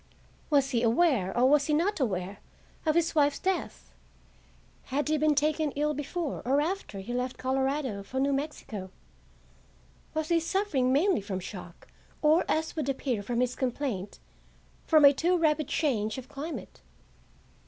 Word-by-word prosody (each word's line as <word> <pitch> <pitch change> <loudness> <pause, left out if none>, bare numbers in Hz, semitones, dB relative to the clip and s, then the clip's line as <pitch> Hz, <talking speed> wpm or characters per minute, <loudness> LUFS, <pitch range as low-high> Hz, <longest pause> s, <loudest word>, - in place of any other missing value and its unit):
Was 280 -3 +3
he 235 -3 +1
aware, 235 - +2
or 250 +2 +5
was 285 +1 +4
he 300 - +2
not 365 +6 +1
aware, 195 -5 -2 0.5
of 310 - +3
his 335 -1 +2
wife's 290 -2 +3
death? 380 -1 -3 0.9
Had 290 +3 -1
he 310 - +2
been 305 0 +3
taken 305 +1 +1
ill 300 +1 +1
before 295 +2 -4
or 270 +3 +2
after 315 - -3
he 240 +5 -6
left 250 +1 -2
Colorado 265 -4 -1
for 255 +7 -4
New 280 +1 +2
Mexico? 270 -9 -4 1.3
Was 315 0 -1
he 340 -1 +4
suffering 330 -7 0
mainly 330 - +3
from 195 -1 -4
shock, 180 -2 -9 0.4
or, 310 +3 +5
as 320 +1 0
would 305 -4 -2
appear 260 -5 -1
from 235 +4 -1
his 250 0 0
complaint, 245 -7 -3 0.7
from 310 -3 +6
a 280 - +8
too 350 +6 +2
rapid 310 -3 +1
change 220 -8 0
of 260 -1 -7
climate? 290 +3 -7
280 Hz, 155 wpm, -28 LUFS, 245-310 Hz, 1.3 s, a